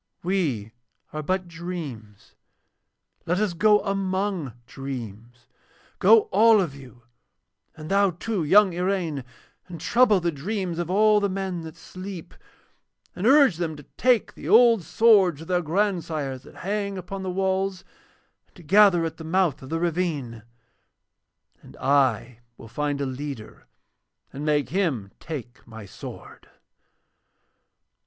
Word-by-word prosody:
We 155 - -1 0.4
are 155 - -3
but 185 +4 -2
dreams, 160 - -8 0.9
let 175 +2 +1
us 205 -2 0
go 210 +4 +4
among 195 - -2
dreams. 120 -3 -8 0.5
Go 455 - +7
all 225 -1 +6
of 170 -8 -1
you, 130 -3 -14 0.7
and 155 +2 -8
thou 200 0 +4
too, 185 +2 -3
young 190 +4 +5
Iraine, 175 -6 -2 0.4
and 175 -2 -9
trouble 220 +3 +3
the 170 -1 -1
dreams 175 +3 -4
of 175 -1 -3
all 210 +2 +4
the 200 -1 0
men 190 -2 -3
that 160 -1 -9
sleep, 185 -2 -9 0.8
and 185 +5 -1
urge 275 - +5
them 165 -3 -3
to 145 - -12
take 250 -3 +2
the - - -8
old 230 -2 +6
swords 190 -5 +4
of 165 - -10
their 180 -1 +1
grandsires 165 -7 -2
that - - -16
hang 200 0 -2
upon 190 +2 -6
the 190 - -4
walls, 190 0 -1 0.6
and - - -37
to 175 - -15
gather 190 0 +5
at 165 - -5
the 160 - -9
mouth 170 -2 0
of 130 - -10
the 165 - -2
ravine; 160 -9 -2 1.2
and - - -15
I 125 -4 +1 0.2
will - - -12
find 145 +4 -2
a - - 0
leader 130 -3 -7 0.7
and 140 - -6
make 150 -1 +1
him 145 - -1
take 130 -6 -7
my 110 -2 -10
sword.' - - -11
175 Hz, 140 wpm, -24 LUFS, 140-195 Hz, 1.2 s, Go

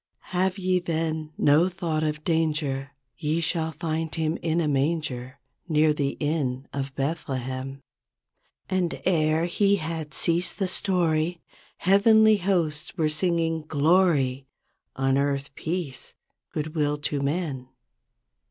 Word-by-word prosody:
" - - -51
'Have 185 +1 +1
ye, 185 -1 +1
then, 160 -2 -2
no 155 +5 +4
thought 170 -3 -2
of 150 0 -2
danger. 150 -5 0 0.3
Ye 155 +1 0
shall 160 -1 0
find 160 0 -3
him 160 -1 0
in 165 0 0
a 165 - +1
manger 140 -3 -1 0.3
Near 155 -1 +4
the 140 -2 -2
inn 140 -4 -1
of 135 -1 -4
Bethlehem.' 135 -2 -3 0.9
And 185 -3 -1
e're 160 -2 +2
he 200 +3 +3
had 160 -3 -4
ceased 175 +1 +1
the 195 - 0
story. 175 -3 +1 0.4
Heavenly 215 +3 +5
hosts 175 -4 -1
were 155 -2 +2
singing, 165 0 0
'Glory, 145 -4 +2 0.5
On 135 0 +2
earth 140 0 -1
peace, 160 -4 -5 0.4
good 155 0 -4
will 150 -2 +1
to 145 -1 -2
men.' 140 -3 -2
155 Hz, 125 wpm, -26 LUFS, 145-170 Hz, 0.9 s, Heavenly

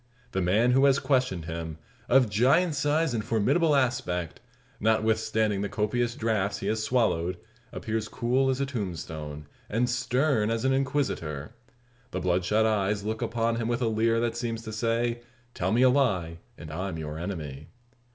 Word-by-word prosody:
The 95 - -1
man 105 +7 +3
who 135 +2 +5
has 135 -1 +5
questioned 125 - 0
him 80 -1 -5 0.3
of 130 -1 +5
giant 130 - +3
size 145 +1 +1
and 110 -2 -1
formidable 140 +10 +2
aspect 90 - -1 0.4
notwithstanding 110 -1 +1
the 100 - -2
copious 120 +3 -1
draughts 105 -3 0
he - - -6
has 110 0 0
swallowed, 90 -8 +1 0.3
appears 110 -1 -3
cool 130 +4 +1
as 130 0 0
a 140 - +1
tombstone, 80 - -5 0.2
and 115 +4 +1
stern 125 -1 +1
as 115 +2 -1
an 135 - +3
Inquisitor. 130 - -2 0.6
The - - -3
bloodshot 90 +5 +2
eyes 105 -1 +1
look 110 +2 -3
upon 115 0 0
him 115 -1 -2
with 120 +1 0
a - - +2
leer 115 +1 +2
that 115 -1 -1
seems 115 -1 -3
to 110 -1 -7
say: 115 +2 0 0.3
"Tell 95 +2 -1
me 120 +3 +4
a 130 - +7
lie, 95 -12 +1 0.2
and 75 - -9
I'm 90 +1 -4
your 75 0 -5
enemy." 75 -6 -5
110 Hz, 165 wpm, -27 LUFS, 95-125 Hz, 0.6 s, a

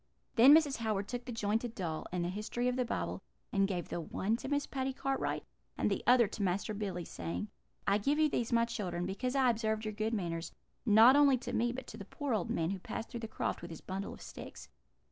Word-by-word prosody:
"Then 260 +5 +9
Mrs. 300 -4 +3
Howard 215 -3 -1
took 245 -1 -5
the 250 - -5
jointed 225 +1 -1
doll, 165 -5 -3
and 175 -1 -1
the - - -1
History 215 +5 -2
of 250 - +1
the 255 - +1
Bible, 240 - -3 0.3
and 195 -1 +3
gave 180 -3 -3
the 170 - -3
one 195 +6 -1
to - - -7
Miss 285 0 0
Patty 265 0 -2
Cartwright, 270 +1 -1 0.3
and - - +1
the - - 0
other 245 -1 +7
to 210 - -6
Master 195 +3 0
Billy, 195 -4 -3
saying: 205 +7 -4 0.4
"'I 200 +1 +3
give 280 +8 +1
you 310 0 +5
these, 240 -5 -1
my 230 0 +4
children, 180 -7 -3
because 225 +8 -2
I 260 -2 +5
observed 220 -1 -1
your 215 - -3
good 215 +2 -1
manners, 170 -4 -3 0.4
not 225 +5 +8
only 285 -2 +6
to 245 - -6
me, 240 +1 +2
but 255 +1 -6
to - - -9
the 200 - -8
poor 285 +4 -3
old 205 -5 0
man 165 +2 0
who 195 - -3
passed 225 - -5
through 235 - -5
the 225 - -5
croft - - -3
with 170 - -7
his 165 - -8
bundle 195 +1 -4
of - - -13
sticks. - - -9
220 Hz, 240 wpm, -33 LUFS, 195-250 Hz, 0.4 s, Then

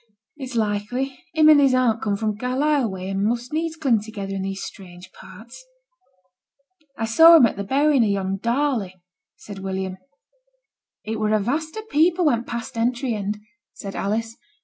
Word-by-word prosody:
'It's 265 -4 -8
likely; 230 +5 -2 0.2
him 310 -1 +5
and 300 -2 +7
his 270 -2 +4
aunt 240 -3 +2
come 205 -2 0
from 215 0 -2
Carlisle 260 +2 0
way, 190 -1 -6
and 195 0 -2
must 240 +5 -2
needs 320 +1 -2
cling 265 -9 +1
together 205 -2 -6
in 195 - -3
these 195 0 -4
strange 180 -2 -11
parts.' 225 - -14 1.3
'I 225 - -1
saw 325 +9 +8
him 270 - +7
at 230 - -1
the 200 - -4
burying 275 +3 +3
of 215 - +1
yon 195 -1 -1
Darley,' 235 -5 -1 0.4
said 200 -2 -10
William. 190 -1 -4 1.0
'It 220 0 -4
were 215 0 +1
a 215 - +3
vast 310 - -3
o' 435 - -5
people 350 -2 +2
went 240 -5 +1
past 235 -1 -5
th' - - -11
entry 240 +2 0
end,' 210 0 -3 0.4
said 195 -1 -8
Alice. 225 +3 -2
230 Hz, 175 wpm, -22 LUFS, 200-275 Hz, 1.3 s, saw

